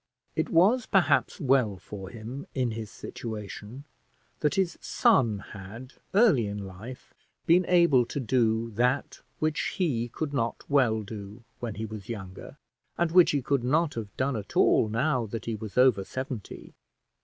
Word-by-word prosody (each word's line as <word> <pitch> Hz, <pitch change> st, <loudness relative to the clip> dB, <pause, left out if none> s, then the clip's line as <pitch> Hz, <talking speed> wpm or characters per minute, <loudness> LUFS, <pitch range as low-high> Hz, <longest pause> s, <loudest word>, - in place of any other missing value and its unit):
It -, -, 0 dB
was 215 Hz, +8 st, +4 dB
perhaps 150 Hz, -10 st, +2 dB
well 125 Hz, -7 st, +2 dB
for 95 Hz, 0 st, -9 dB
him, 115 Hz, +6 st, -8 dB
in 125 Hz, -3 st, 0 dB
his 110 Hz, -1 st, -5 dB
situation, 110 Hz, +2 st, -7 dB, 0.6 s
that 150 Hz, -2 st, +1 dB
his 185 Hz, -3 st, +1 dB
son 115 Hz, -5 st, +3 dB
had 110 Hz, +7 st, -10 dB, 0.2 s
early 190 Hz, -, +5 dB
in 100 Hz, 0 st, -5 dB
life 105 Hz, +7 st, -10 dB, 0.3 s
been 175 Hz, +2 st, +4 dB
able 170 Hz, -9 st, +4 dB
to -, -, -4 dB
do 115 Hz, -2 st, +1 dB
that 125 Hz, +5 st, 0 dB, 0.2 s
which 155 Hz, 0 st, -1 dB
he 135 Hz, -, 0 dB
could 145 Hz, +4 st, -4 dB
not 115 Hz, -4 st, -2 dB
well 120 Hz, -6 st, +2 dB
do 105 Hz, +2 st, -9 dB, 0.2 s
when 115 Hz, -4 st, -4 dB
he 110 Hz, -, -4 dB
was 110 Hz, -1 st, -9 dB
younger, 95 Hz, -5 st, -8 dB, 0.4 s
and 170 Hz, -1 st, +1 dB
which 180 Hz, 0 st, +6 dB
he 140 Hz, -3 st, 0 dB
could 140 Hz, -2 st, 0 dB
not 155 Hz, +5 st, +2 dB
have 110 Hz, -3 st, -7 dB
done 130 Hz, 0 st, 0 dB
at 105 Hz, -3 st, -5 dB
all 110 Hz, -, +4 dB
now 125 Hz, +1 st, 0 dB
that 110 Hz, 0 st, -6 dB
he 115 Hz, -, -2 dB
was 110 Hz, 0 st, -7 dB
over 125 Hz, -6 st, +5 dB
seventy. 130 Hz, -1 st, -7 dB
120 Hz, 160 wpm, -28 LUFS, 110-140 Hz, 0.6 s, which